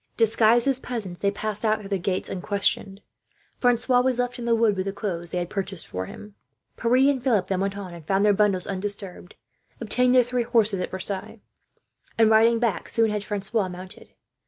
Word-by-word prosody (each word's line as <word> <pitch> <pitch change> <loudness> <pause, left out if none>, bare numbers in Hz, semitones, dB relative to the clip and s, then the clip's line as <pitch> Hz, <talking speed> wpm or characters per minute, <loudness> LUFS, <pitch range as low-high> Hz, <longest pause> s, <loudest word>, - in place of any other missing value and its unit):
Disguised 225 +2 +3
as 270 -2 +1
peasants, 210 -10 -5
they 200 - +1
passed 210 +1 -2
out 215 0 +2
through 200 -2 -10
the 195 -2 -1
gates 185 +1 -2
unquestioned. 195 +1 -2 0.6
Francois 245 0 +3
was 255 -1 0
left 245 0 -2
in 235 - -5
the 235 -1 +3
wood, 225 -3 +2
with 190 0 -3
the - - -1
clothes 175 -5 -4
they 180 - -4
had 175 -1 -2
purchased 195 -3 -4
for 95 0 -5
him. 210 -1 -11 0.4
The 230 - -1 0.4
others 210 -7 +2
then 190 -2 0
went 195 0 -2
on 190 -3 -7
and 170 -2 -10
found 195 +1 +2
their 205 - +5
bundles 195 -3 +2
undisturbed, 195 -2 -5 0.4
obtained 250 +3 +2
their 250 - +6
three 245 +1 -1
horses 225 -4 +2
at 180 - -3
Versailles 190 +3 -5 0.8
and, 225 -1 +5
riding 225 +1 +5
back, 230 -5 -1
soon 225 -2 +2
had 210 -1 -2
Francois 205 0 -2
mounted. 185 +1 -9
210 Hz, 195 wpm, -24 LUFS, 190-230 Hz, 0.8 s, their